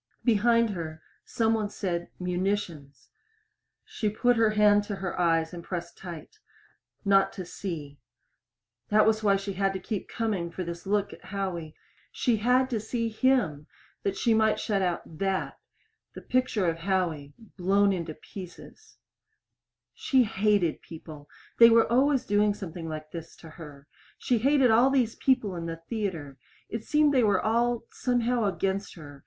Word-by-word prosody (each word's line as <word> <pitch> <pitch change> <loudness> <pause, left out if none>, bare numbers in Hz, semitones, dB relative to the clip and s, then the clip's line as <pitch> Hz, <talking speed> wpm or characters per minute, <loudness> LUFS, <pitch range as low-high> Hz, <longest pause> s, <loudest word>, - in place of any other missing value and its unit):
Behind 230 0 +3
her 160 -4 -6 0.3
some 225 -1 +1
one 215 -2 -1
said 175 -4 -3
"munitions." 175 - -3 0.8
She 215 - -2
put 245 +4 +2
her 225 -1 +3
hand 210 -1 +4
to 205 - -4
her 190 -2 -5
eyes 165 -1 +2
and 170 -1 -7
pressed 170 -1 -6
tight. 175 - -10 0.7
Not 195 -1 +4
to 185 - -6
see. 155 -7 -7 0.9
That 215 +1 +5
was 220 0 +2
why 200 -2 +3
she 195 0 -3
had 195 +1 0
to 190 - -4
keep 205 +2 -5
coming 205 -7 -2
for 180 +2 -5
this 170 +2 -7
look 205 0 0
at - - -15
Howie. 185 -5 -4 0.4
She 240 -4 +1
had 250 +4 +3
to 225 - 0
see 230 +2 -2
him 220 - +1 0.3
that 195 -1 -2
she 230 - +2
might 220 0 +2
shut 205 -3 0
out 175 -3 -3
that 195 -1 -2 0.6
the - - -8
picture 255 -6 0
of 165 0 -1
Howie 165 -6 -2 0.2
blown 200 +2 +3
into 165 -4 -4
pieces. 190 - -12 1.0
She 260 -2 +2
hated 205 -5 +1
people. 155 -3 -11 0.3
They 230 0 +10
were 230 0 +5
always 265 +2 +3
doing 205 0 +2
something 170 -4 -7
like 155 0 -7
this 165 -1 -8
to 160 - -13
her. 150 -4 -12 0.3
She 245 -3 0
hated 270 0 +4
all 240 +4 +5
these 250 -5 +1
people 250 -8 +1
in 170 -1 -5
the 165 0 -5
theater. 170 - -4 0.3
It 225 0 -4
seemed 300 +1 +3
they 255 -3 +4
were 200 -3 +3
all, 235 +1 +1
somehow, 245 -2 0
against 195 0 -2
her. 145 -4 -11
200 Hz, 160 wpm, -27 LUFS, 170-225 Hz, 1.0 s, They